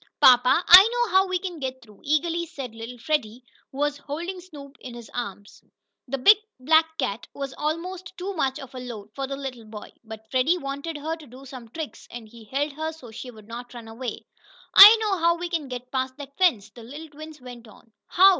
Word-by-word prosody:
"Papa, 250 Hz, +6 st, +6 dB
I 380 Hz, +5 st, +10 dB
know 485 Hz, -1 st, 0 dB
how 380 Hz, +1 st, +4 dB
we 370 Hz, 0 st, 0 dB
can 355 Hz, -2 st, -6 dB
get 260 Hz, -2 st, -5 dB
through," 210 Hz, -3 st, -19 dB
eagerly 335 Hz, +3 st, 0 dB
said 275 Hz, -8 st, -8 dB
little 230 Hz, +2 st, -9 dB
Freddie, 240 Hz, -2 st, -2 dB, 0.3 s
who 265 Hz, -, -12 dB
was 290 Hz, 0 st, -1 dB
holding 340 Hz, +6 st, -6 dB
Snoop 290 Hz, -6 st, -13 dB
in 245 Hz, -2 st, -9 dB
his 235 Hz, -2 st, -11 dB
arms. 205 Hz, -4 st, -7 dB, 0.4 s
The 275 Hz, +2 st, -3 dB
big 400 Hz, +11 st, +7 dB, 0.2 s
black 320 Hz, +4 st, +3 dB
cat 205 Hz, +4 st, -3 dB
was 275 Hz, -1 st, -5 dB
almost 345 Hz, +4 st, -5 dB
too 380 Hz, +3 st, -4 dB
much 270 Hz, -6 st, -1 dB
of 270 Hz, -2 st, -11 dB
a 255 Hz, -, -7 dB
load 225 Hz, -5 st, -9 dB
for 275 Hz, -1 st, -4 dB
the 275 Hz, -, -4 dB
little 260 Hz, -4 st, -7 dB
boy, 215 Hz, -1 st, -10 dB
but 220 Hz, 0 st, -11 dB
Freddie 270 Hz, +7 st, +2 dB
wanted 280 Hz, +1 st, -5 dB
her 315 Hz, +3 st, -3 dB
to 310 Hz, -3 st, -14 dB
do 255 Hz, +3 st, -13 dB
some 255 Hz, -3 st, -11 dB
tricks, 315 Hz, +5 st, -8 dB
and 235 Hz, -2 st, -9 dB
he 225 Hz, 0 st, -15 dB
held 280 Hz, +6 st, -2 dB
her 315 Hz, +2 st, -4 dB
so 265 Hz, -8 st, -13 dB
she 250 Hz, +3 st, -8 dB
would 215 Hz, -3 st, -14 dB
not 240 Hz, +2 st, -9 dB
run 235 Hz, -2 st, -9 dB
away. 230 Hz, +2 st, -7 dB, 0.5 s
"I 420 Hz, +3 st, +11 dB
know 405 Hz, -4 st, 0 dB
how 340 Hz, +1 st, +3 dB
to 350 Hz, +1 st, -4 dB, 0.2 s
get 250 Hz, 0 st, -8 dB
past 260 Hz, 0 st, -2 dB
that 280 Hz, -1 st, -10 dB
fence," 225 Hz, -, +1 dB
the 235 Hz, -, -13 dB
little 290 Hz, +8 st, -10 dB
twin 310 Hz, +1 st, -11 dB
went 245 Hz, -2 st, -11 dB
on. 225 Hz, +2 st, -19 dB, 0.2 s
"How?" 380 Hz, +2 st, +6 dB
275 Hz, 215 wpm, -24 LUFS, 240-320 Hz, 0.5 s, I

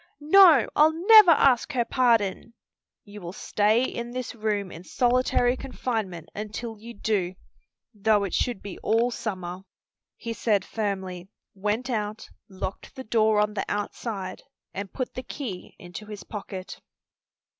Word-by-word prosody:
"No; 310 Hz, -, +7 dB
I'll 310 Hz, +1 st, +5 dB
never 430 Hz, -4 st, +10 dB
ask 275 Hz, -6 st, +4 dB
her 240 Hz, -3 st, +1 dB
pardon!" 230 Hz, -3 st, +1 dB, 0.5 s
"You 205 Hz, 0 st, -11 dB
will 175 Hz, 0 st, -7 dB
stay 215 Hz, +4 st, +1 dB
in 235 Hz, -2 st, -4 dB
this 255 Hz, 0 st, -5 dB
room 210 Hz, -4 st, -2 dB
in 165 Hz, -, -10 dB
solitary 245 Hz, +2 st, +2 dB
confinement 220 Hz, -, -4 dB
until 215 Hz, +1 st, -6 dB
you 235 Hz, +2 st, -10 dB
do, 195 Hz, -4 st, -1 dB, 0.6 s
though 210 Hz, 0 st, +2 dB
it 195 Hz, -, -4 dB
should 240 Hz, -6 st, -1 dB
be 200 Hz, -3 st, -8 dB
all 230 Hz, +2 st, +1 dB
summer," 185 Hz, -6 st, -5 dB, 0.6 s
he 230 Hz, -, -5 dB
said 215 Hz, -3 st, +1 dB
firmly, 190 Hz, -4 st, -4 dB, 0.3 s
went 210 Hz, +5 st, -2 dB
out, 215 Hz, -3 st, -3 dB, 0.2 s
locked 190 Hz, 0 st, -7 dB
the 260 Hz, -, -7 dB
door 220 Hz, -2 st, +2 dB
on 210 Hz, 0 st, +1 dB
the 205 Hz, -, -2 dB
outside, 205 Hz, -2 st, -4 dB, 0.3 s
and 195 Hz, 0 st, -6 dB
put 255 Hz, -, -4 dB
the 255 Hz, -, -5 dB
key 240 Hz, -7 st, -7 dB
into 175 Hz, +4 st, -10 dB
his 210 Hz, -2 st, -8 dB
pocket. 195 Hz, -3 st, -8 dB
215 Hz, 145 wpm, -26 LUFS, 195-245 Hz, 0.6 s, never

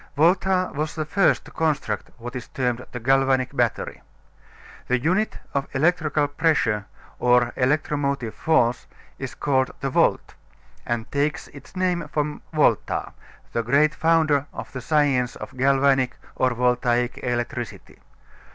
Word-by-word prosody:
Volta 185 Hz, +3 st, +3 dB
was 150 Hz, +1 st, -3 dB
the 155 Hz, -1 st, -2 dB
first 190 Hz, +6 st, +2 dB
to -, -, -13 dB
construct 145 Hz, -10 st, -1 dB
what 120 Hz, +1 st, -8 dB
is 125 Hz, -, -6 dB
termed 125 Hz, -2 st, -2 dB
the 125 Hz, -, -5 dB
galvanic 135 Hz, +1 st, +2 dB
battery. -, -, -1 dB, 0.9 s
The 125 Hz, -, +2 dB
unit 185 Hz, -, 0 dB, 0.2 s
of 140 Hz, 0 st, -1 dB
electrical 150 Hz, -1 st, +2 dB
pressure 145 Hz, -9 st, +1 dB, 0.3 s
or 125 Hz, -1 st, +3 dB
electromotive 140 Hz, -2 st, 0 dB
force 125 Hz, -7 st, +1 dB, 0.3 s
is -, -, -5 dB
called 130 Hz, -2 st, +1 dB
the 135 Hz, -, -2 dB
volt, -, -, +2 dB, 0.5 s
and 120 Hz, -1 st, -2 dB
takes 145 Hz, +1 st, -1 dB
its 140 Hz, +5 st, -14 dB
name 180 Hz, -3 st, 0 dB
from 150 Hz, 0 st, -2 dB
Volta, 155 Hz, -2 st, +1 dB, 0.4 s
the 115 Hz, -, +1 dB
great 140 Hz, +6 st, +3 dB
founder 155 Hz, -4 st, +2 dB
of -, -, -8 dB
the 130 Hz, -, -6 dB
science 135 Hz, -3 st, +1 dB
of -, -, -9 dB
galvanic 135 Hz, 0 st, +3 dB, 0.2 s
or 130 Hz, -, +2 dB
voltaic 125 Hz, 0 st, +1 dB
electricity. 120 Hz, 0 st, -4 dB
135 Hz, 135 wpm, -24 LUFS, 125-155 Hz, 0.9 s, Volta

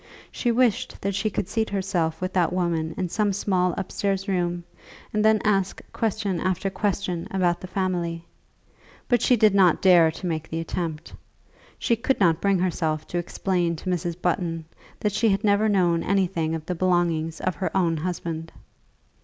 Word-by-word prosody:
She 240 Hz, -, 0 dB
wished 235 Hz, -3 st, +1 dB
that 200 Hz, +1 st, -1 dB
she 200 Hz, +3 st, 0 dB
could 195 Hz, -, -3 dB
seat 225 Hz, -1 st, -1 dB
herself 185 Hz, -5 st, -1 dB
with 185 Hz, 0 st, -2 dB
that 180 Hz, -3 st, +2 dB
woman 170 Hz, -3 st, -1 dB
in 185 Hz, -, -1 dB
some 205 Hz, +3 st, 0 dB
small 185 Hz, -2 st, 0 dB
upstairs 195 Hz, +1 st, -2 dB
room, 175 Hz, -2 st, -1 dB, 0.5 s
and 210 Hz, 0 st, +1 dB
then 220 Hz, 0 st, +5 dB
ask 195 Hz, -3 st, +1 dB
question 210 Hz, -5 st, -1 dB
after 185 Hz, +2 st, -1 dB
question 190 Hz, -4 st, -2 dB
about 180 Hz, -3 st, +1 dB
the 185 Hz, -, -7 dB
family. 175 Hz, -3 st, -2 dB, 0.8 s
But 245 Hz, -3 st, +2 dB
she 250 Hz, -, +4 dB
did 215 Hz, -2 st, +5 dB
not 185 Hz, -4 st, +5 dB
dare 175 Hz, -4 st, +6 dB
to 165 Hz, +3 st, -7 dB
make 160 Hz, -2 st, -3 dB
the 165 Hz, -, -3 dB
attempt. 165 Hz, -1 st, -4 dB, 0.6 s
She 235 Hz, -, +1 dB
could 255 Hz, +4 st, 0 dB
not 170 Hz, -5 st, +3 dB
bring 200 Hz, -1 st, +3 dB
herself 160 Hz, -4 st, -1 dB
to 175 Hz, -, -1 dB
explain 175 Hz, -1 st, -1 dB
to 185 Hz, +3 st, -4 dB
Mrs. 175 Hz, -1 st, -2 dB
Button 170 Hz, -2 st, -1 dB, 0.4 s
that 210 Hz, -, +1 dB
she 225 Hz, +2 st, +2 dB
had 195 Hz, +1 st, +1 dB
never 210 Hz, +1 st, +3 dB
known 175 Hz, -4 st, +2 dB
anything 175 Hz, -5 st, 0 dB
of 160 Hz, -1 st, -6 dB
the 180 Hz, -, -2 dB
belongings 170 Hz, -3 st, 0 dB
of 185 Hz, -, -1 dB
her 190 Hz, -, -1 dB
own 170 Hz, -3 st, +2 dB
husband. 165 Hz, -1 st, -4 dB
185 Hz, 175 wpm, -25 LUFS, 170-200 Hz, 0.8 s, dare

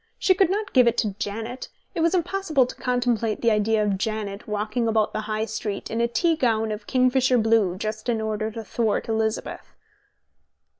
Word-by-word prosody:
She 375 Hz, -, +3 dB
could 380 Hz, -2 st, +3 dB
not 415 Hz, +2 st, -2 dB
give 250 Hz, -3 st, +6 dB
it 235 Hz, -, +2 dB
to 210 Hz, -3 st, 0 dB
Janet: 225 Hz, +3 st, -5 dB, 0.2 s
it 330 Hz, -, -2 dB
was 335 Hz, +3 st, +3 dB
impossible 345 Hz, -6 st, +1 dB
to 250 Hz, -, -7 dB
contemplate 240 Hz, -3 st, 0 dB
the 230 Hz, -, +3 dB
idea 215 Hz, 0 st, +2 dB
of 200 Hz, -2 st, 0 dB
Janet 215 Hz, -1 st, -3 dB
walking 215 Hz, +3 st, -1 dB
about 220 Hz, -1 st, +1 dB
the 215 Hz, -, -2 dB
High 215 Hz, +1 st, -1 dB
Street 215 Hz, -2 st, -5 dB
in 225 Hz, +1 st, -1 dB
a 235 Hz, -, +3 dB
tea 325 Hz, +8 st, +1 dB
gown 225 Hz, -6 st, +1 dB
of 210 Hz, 0 st, -6 dB
kingfisher 255 Hz, 0 st, +3 dB
blue 220 Hz, -5 st, +2 dB
just 215 Hz, +3 st, -4 dB
in 230 Hz, -2 st, +1 dB
order 215 Hz, 0 st, -2 dB
to 225 Hz, 0 st, -7 dB
thwart 220 Hz, 0 st, -1 dB
Elizabeth. 220 Hz, -1 st, -3 dB
225 Hz, 190 wpm, -24 LUFS, 215-250 Hz, 0.2 s, give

